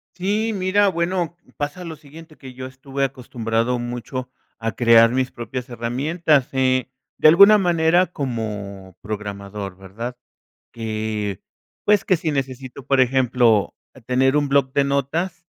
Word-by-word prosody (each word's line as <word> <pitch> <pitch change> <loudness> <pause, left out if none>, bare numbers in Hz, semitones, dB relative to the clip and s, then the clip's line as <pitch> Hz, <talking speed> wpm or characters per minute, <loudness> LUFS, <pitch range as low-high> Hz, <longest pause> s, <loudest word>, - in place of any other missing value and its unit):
Sí, 210 +5 0
mira, 200 +1 +2
bueno, 175 -1 -1 0.2
pasa 145 +4 -4
lo 165 -1 -6
siguiente, 155 +2 -15
que 130 -2 -11
yo 130 +1 -7
estuve 135 +1 -5
acostumbrado 120 -2 -1
mucho 120 +1 -5 0.3
a 115 0 -2
crear 115 -1 +5
mis 130 +1 0
propias 120 +2 -6
herramientas, 135 +5 0
eh, 130 -1 +1 0.3
de - - +5
alguna 200 +7 +8
manera 175 0 +3
como 105 - -5
programador, 100 -2 -6
¿verdad? 115 +6 -7 0.5
Que, 110 -3 -3 0.4
pues, 210 0 +3
que 190 - +3
si 160 -1 -2
necesito, 130 -1 -5
por 135 -1 +2
ejemplo, 125 -4 +2 0.3
tener 130 +3 +2
un 145 -1 0
bloc 135 -1 +2
de 140 - +3
notas, 150 +6 -2
130 Hz, 135 wpm, -21 LUFS, 115-160 Hz, 0.5 s, alguna